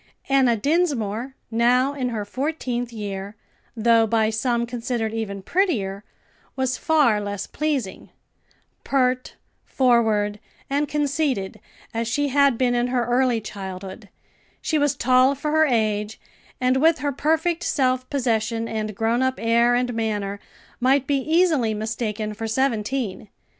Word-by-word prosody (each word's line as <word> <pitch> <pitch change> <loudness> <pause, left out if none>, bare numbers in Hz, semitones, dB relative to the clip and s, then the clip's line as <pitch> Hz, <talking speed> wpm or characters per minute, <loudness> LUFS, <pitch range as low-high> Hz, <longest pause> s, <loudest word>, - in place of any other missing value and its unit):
Enna 260 -4 +4
Dinsmore, 265 - 0 0.2
now 250 +4 +3
in 260 -3 -2
her 215 -3 -3
fourteenth 250 -1 -3
year, 200 -2 -6 0.4
though 230 0 +4
by 220 0 +2
some 235 +1 0
considered 235 -2 -3
even 200 -3 -4
prettier, 210 - 0 0.5
was 260 -1 0
far 280 -10 +2
less 205 -1 -4
pleasing 280 -10 -3 0.7
pert, 255 -2 0 0.3
forward, 220 -5 +2 0.3
and 290 +2 +1
conceited 285 -8 -1 0.3
as 230 0 -2
she 285 +5 0
had 280 -2 +3
been 250 -1 +2
in 240 0 +1
her 245 -1 0
early 245 0 +2
childhood; 195 0 -8 0.5
she 310 - 0
was 290 -2 +2
tall 255 +2 +4
for 300 +2 -3
her 315 0 +4
age, 215 -3 0 0.4
and 255 +1 +2
with 320 +4 +4
her 285 0 -1
perfect 320 +4 0
self 255 -5 0
possession 230 -4 0
and 215 -2 -3
grown 225 +4 +1
up 260 0 +1
air 235 +1 +3
and 245 0 0
manner, 205 -3 -2 0.4
might 265 +2 +3
be 280 0 +1
easily 310 -7 +2
mistaken 215 0 -3
for 225 +2 -5
seventeen. 225 -3 -1
240 Hz, 135 wpm, -23 LUFS, 220-275 Hz, 0.7 s, Enna